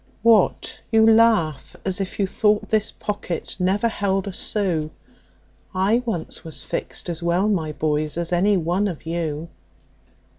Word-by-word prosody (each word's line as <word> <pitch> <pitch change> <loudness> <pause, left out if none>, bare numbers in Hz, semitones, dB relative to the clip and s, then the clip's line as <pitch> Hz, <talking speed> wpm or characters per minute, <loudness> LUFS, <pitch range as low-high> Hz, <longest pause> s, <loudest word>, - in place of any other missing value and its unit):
What? 225 -4 +3
You 220 -1 +5
laugh 220 -10 +3
as 190 +1 -1
if 190 - -5
you 200 - +2
thought 210 +2 +1
this 215 -1 +2
pocket 205 -5 -4
never 195 +5 +2
held 195 -3 -1
a 195 - -4
sou; 180 -7 -1 0.9
I 200 +6 +2
once 175 -8 -3
was 160 -2 -6
fixed - - -3
as 170 -1 -3
well, 170 +4 +1
my 170 -7 0
boys, 150 +1 -1
as 170 0 -2
any 195 +3 +3
one 180 +4 0
of 165 -5 -6
you. 165 -1 -3
185 Hz, 150 wpm, -22 LUFS, 165-210 Hz, 0.9 s, You